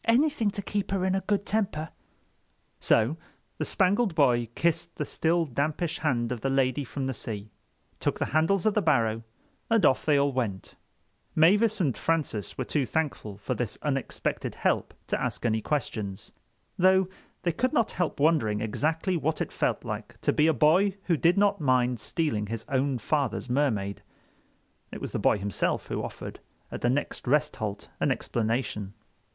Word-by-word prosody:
"Anything 240 -1 +3
to 200 0 -5
keep 205 0 -2
her 195 -2 0
in 190 - +1
a 190 - +1
good 205 0 0
temper." 190 -7 -1 0.9
So 115 +8 +2 0.4
the - - 0
Spangled 195 0 +2
Boy 120 -6 +3
kissed 170 0 0
the 150 - -2
still 165 +3 +1
dampish 150 +5 -1
hand 120 -6 0
of 120 -3 -3
the 135 - 0
Lady 135 0 +1
from 135 +1 -4
the 130 - -1
Sea, 105 -2 -6 0.5
took - - 0
the - - 0
handles 165 +5 +2
of 215 - +4
the 210 - +2
barrow 115 - +2 0.5
and 225 -6 +4
off 130 - +4
they 150 -2 +3
all 140 0 +3
went. 110 -8 -3
[Illustration: - - -33
"The - - -12
police."] 165 +3 +8
Mavis 210 0 +2
and 140 -8 +1
Francis 150 -11 -1
were 130 - -2
too 145 0 0
thankful 140 -10 -2
for 105 - -3
this 120 -4 -3
unexpected 135 -3 -2
help - - 0
to - - -2
ask - - -2
any 110 -1 +1
questions, 110 -8 -3 0.5
though 190 0 +5 0.4
they 175 - +2
could 250 +10 0
not 230 - +2
help 175 -5 -2
wondering 140 -9 +3
exactly 160 - 0
what 160 -1 -1
it - - -2
felt - - -1
like - - -6
to - - +2
be 150 - +4
a - - +6
boy 180 - +3
who 175 - +2
did 170 +5 +3
not 200 -2 +3
mind 125 -3 +2
stealing 110 -7 -1
his 110 +1 -5
own 135 -1 +1
father's 135 0 -1
Mermaid. 110 -8 0 0.9
It - - -6
was - - -5
the - - -2
boy - - +3
himself 100 -1 -1
who - - -2
offered, - - -7 0.3
at - - -5
the 120 - +2
next 135 0 -2
rest 150 +3 +2
halt, 105 -4 -4
an - - +2
explanation. 110 -3 -2
145 Hz, 180 wpm, -27 LUFS, 120-175 Hz, 0.9 s, police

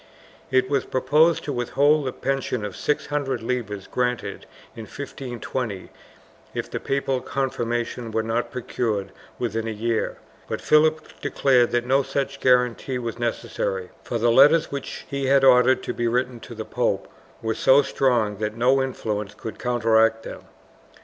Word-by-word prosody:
It 130 -1 +3
was 140 0 +1
proposed 150 +6 +3
to 145 - -3
withhold 140 +4 +2
the - - -1
pension 135 -5 -2
of 105 - -6
six 150 - -1
hundred 135 -5 -2
libras 110 -5 -3
granted 125 -1 -2 0.3
in 115 -2 -7
1520, 125 -6 -5 0.6
if - - -4
the - - -3
papal 135 -1 -1
confirmation 120 -3 -2
were 110 0 -1
not 115 +2 -1
procured 110 -5 -2 0.3
within 115 -1 -2
a - - -2
year, 115 +1 -1 0.3
but - - -3
Philip 155 +1 +4 0.2
declared 125 -3 +3
that 120 0 0
no 135 +2 +3
such 135 0 -3
guarantee 125 0 +2
was 120 -1 -5
necessary, 95 -5 -2
for 120 - -2
the 115 +1 +3
letters 150 +6 +6
which 140 -1 -6
he 140 -1 -2
had 135 0 +4
ordered 130 0 +5
to - - -3
be 120 - -1
written 125 +1 -1
to 120 - -10
the 110 0 -5
pope - - -1 0.4
were 110 0 0
so 135 +5 +5
strong 120 -7 +1
that 105 +1 -3
no 130 +3 +3
influence 105 -6 -3
could 110 - -8
counteract 115 -2 +2
them. - - -9
125 Hz, 155 wpm, -24 LUFS, 115-135 Hz, 0.6 s, letters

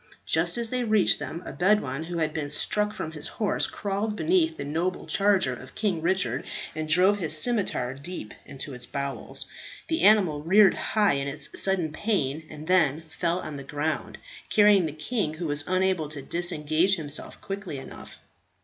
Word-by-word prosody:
Just 170 +4 +2
as 235 -1 0
they 250 -1 0
reached 215 -4 +3
them 170 +2 -6
a - - -7
Bedouin 160 -3 +1
who 175 +1 -5
had 155 -2 -1
been 150 -3 -3
struck 210 +7 +2
from 160 - -5
his 150 -2 -4
horse 210 -3 0
crawled 205 +1 -3
beneath 325 +3 +1
the - - -5
noble 165 +5 -2
charger 200 -1 +2
of - - -11
King 195 -7 -1
Richard, 165 -7 0 0.3
and 155 0 -4
drove 185 +5 +4
his 155 -3 +5
scimitar 190 - +2
deep 140 -4 -6
into 140 0 -5
its 125 -1 -6
bowels. 140 -1 -4 0.4
The 325 0 0
animal 185 -9 +4
reared 190 +5 +5
high 210 -2 +1
in 140 0 -2
its 140 +1 0
sudden 185 -5 +1
pain, 160 -6 -2
and 150 0 -9
then 160 -4 +3
fell 170 +2 -1
on 150 -2 -7
the 140 - -7
ground, 145 +3 -3 0.3
carrying 205 -4 +5
the - - -4
king, 155 - -2
who 170 +2 -5
was 145 -1 0
unable 185 -4 0
to 145 -3 -8
disengage 170 +2 +1
himself 150 -4 -6
quickly 195 -6 -6
enough. 135 - -10
170 Hz, 175 wpm, -26 LUFS, 150-200 Hz, 0.4 s, his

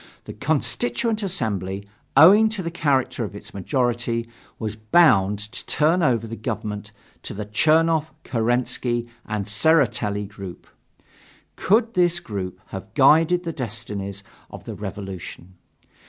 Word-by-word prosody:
The - - -8
Constituent 145 - -1
Assembly, 100 - -2 0.3
owing 200 +9 +8
to 215 -4 -2
the 170 - -3
character 140 -7 0
of 105 -1 -6
its 105 - -10
majority, 120 +2 -1 0.3
was 110 -2 -4
bound 110 - +4
to 105 +1 -6
turn 160 +4 +2
over 120 -7 +2
the 115 0 -6
government 105 -1 -5 0.3
to - - -7
the 105 +1 -4
Chernov, 160 +7 +2
Kerensky 120 0 0 0.2
and 105 -2 -2
Tseretelli 105 -4 +1
group. 100 -3 -10 0.9
Could 225 +3 +2
this 175 -3 +3
group 95 - -6
have - - -8
guided 165 +3 +5
the 165 -1 -4
destinies 105 -6 -5 0.3
of - - -10
the - - -7
Revolution? 95 -3 -7
120 Hz, 125 wpm, -23 LUFS, 105-160 Hz, 0.9 s, owing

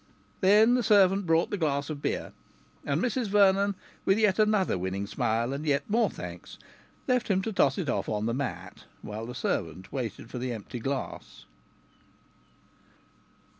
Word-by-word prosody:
Then 210 +5 +5
the 250 - +3
servant 200 -3 +4
brought 165 +1 +2
the 205 - -2
glass 140 -3 0
of 145 -2 -6
beer, - - -3 0.5
and 140 +1 0
Mrs 245 +2 -1
Vernon, 200 0 +4 0.3
with 195 - +3
yet 215 -2 +2
another 210 - +3
winning 95 +2 -3
smile, 115 +4 -1
and 140 +2 -4
yet 140 -2 0
more 230 +3 +2
thanks, - - -9 0.5
left 250 -2 +1
him 190 -2 +1
to 225 - -3
toss 135 -7 +3
it 175 - -2
off - - -1
on 105 0 -1
the 115 - 0
mat, 135 +2 -5 0.2
while 110 +2 -6
the 125 - -7
servant 95 -3 -3
waited 120 -3 -5
for 125 - -5
the 125 0 -3
empty 115 +2 -7
glass. 135 +3 -5
155 Hz, 165 wpm, -28 LUFS, 120-200 Hz, 0.5 s, Then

